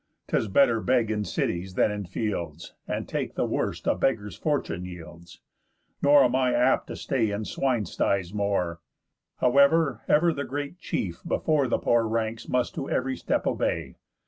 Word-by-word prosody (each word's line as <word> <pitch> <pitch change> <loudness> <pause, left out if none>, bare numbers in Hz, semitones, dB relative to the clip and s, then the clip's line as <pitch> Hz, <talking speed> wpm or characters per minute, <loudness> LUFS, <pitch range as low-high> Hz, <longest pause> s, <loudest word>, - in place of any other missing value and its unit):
'Tis 110 - +1
better 115 +2 +3
beg 120 -3 +2
in 105 -1 -1
cities 90 -1 -2
than 105 - +3
in 100 -3 -5
fields, 85 -5 -4
And - - -3
take - - -3
the - - 0
worst - - -2
a - - +3
beggar's 105 -6 -1
fortune 135 - -2
yields. 85 -1 -11 0.6
Nor 145 0 +6
am 125 0 +2
I 130 -2 +2
apt 125 +2 +2
to - - -6
stay 115 -5 0
in 105 +1 -3
swine 125 -4 0
styes 95 +1 -1
more, 100 -5 -1 0.6
However; 140 0 +4
ever 165 +2 +4
the 140 - -3
great 145 +5 -5
chief 85 - -3
before 155 -4 +1
The - - +1
poor 115 -1 +2
ranks 110 0 -2
must 125 -1 0
to 135 - -5
ev'ry 130 +1 0
step - - -1
obey. - - -1
115 Hz, 170 wpm, -26 LUFS, 100-135 Hz, 0.6 s, Nor